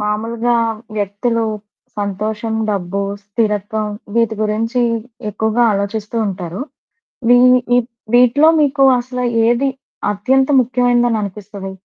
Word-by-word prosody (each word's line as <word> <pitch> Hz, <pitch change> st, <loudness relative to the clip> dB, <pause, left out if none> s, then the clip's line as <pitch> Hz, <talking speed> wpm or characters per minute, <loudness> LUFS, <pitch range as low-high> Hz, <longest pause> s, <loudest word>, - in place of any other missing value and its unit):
మామూలుగా 225 Hz, +3 st, -1 dB, 0.4 s
వ్యక్తులు 210 Hz, +3 st, -1 dB, 0.5 s
సంతోషం, 210 Hz, +2 st, -3 dB, 0.2 s
డబ్బు, 195 Hz, -1 st, -2 dB, 0.2 s
స్థిరత్వం 210 Hz, 0 st, -1 dB, 0.3 s
వీటి 230 Hz, -1 st, +2 dB
గురించి 225 Hz, +3 st, 0 dB, 0.5 s
ఎక్కువగా 220 Hz, +3 st, +1 dB
ఆలోచిస్తూ 205 Hz, +2 st, -3 dB
ఉంటారు. 180 Hz, 0 st, -5 dB, 0.7 s
ఇవి 245 Hz, -, +7 dB, 0.3 s
వి 245 Hz, -, +5 dB, 0.4 s
వీటిలో 250 Hz, +6 st, +5 dB
మీకు 275 Hz, -1 st, +2 dB, 0.2 s
అసలు 250 Hz, 0 st, -4 dB, 0.2 s
ఏది 240 Hz, +4 st, +2 dB, 0.4 s
అత్యంత 260 Hz, +7 st, +1 dB
ముఖ్యమైనందని 245 Hz, -1 st, +1 dB
అనిపిస్తది? 200 Hz, -1 st, -7 dB
220 Hz, 95 wpm, -17 LUFS, 205-245 Hz, 0.7 s, ఇవి